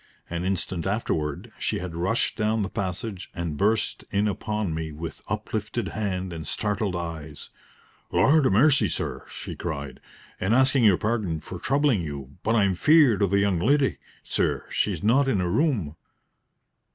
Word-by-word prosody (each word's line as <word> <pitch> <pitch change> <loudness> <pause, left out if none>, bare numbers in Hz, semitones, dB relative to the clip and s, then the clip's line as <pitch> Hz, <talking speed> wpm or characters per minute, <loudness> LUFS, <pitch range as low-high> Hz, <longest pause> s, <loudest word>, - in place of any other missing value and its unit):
An 85 0 -2
instant 95 -2 -1
afterward 80 -8 -2
she - - 0
had 90 -1 -5
rushed 95 +8 0
down 110 -1 +1
the 95 - -4
passage 95 0 -4
and 85 -3 -3
burst 105 +7 +1
in 100 +2 +1
upon 105 -2 -2
me 80 0 -3
with 80 +1 -7
uplifted 105 +2 -3
hand 95 -4 -3
and 80 -2 -6
startled 105 -3 -1
eyes. 80 -4 -6 0.6
"Lord 150 -1 +4
'a - - +3
mercy, 135 +8 +4
sir!" - - -3
she - - -7
cried, 70 -5 -5 0.4
"and 100 +5 +2
asking 130 -1 +4
your 100 -4 +6
pardon 105 -8 -1
for 90 +3 -8
troubling 135 -3 +2
you, 70 -2 -7
but 115 - +1
I'm 100 -4 +3
feared 140 - +5
o' 100 - +4
the 100 +2 +2
young 100 -3 +2
leddy, 135 - +2 0.2
sir; - - 0
she - - +1
is - - -5
not 130 +6 +4
in 110 -8 +2
her 90 -1 0
room." 110 - +1
100 Hz, 165 wpm, -25 LUFS, 85-115 Hz, 0.6 s, your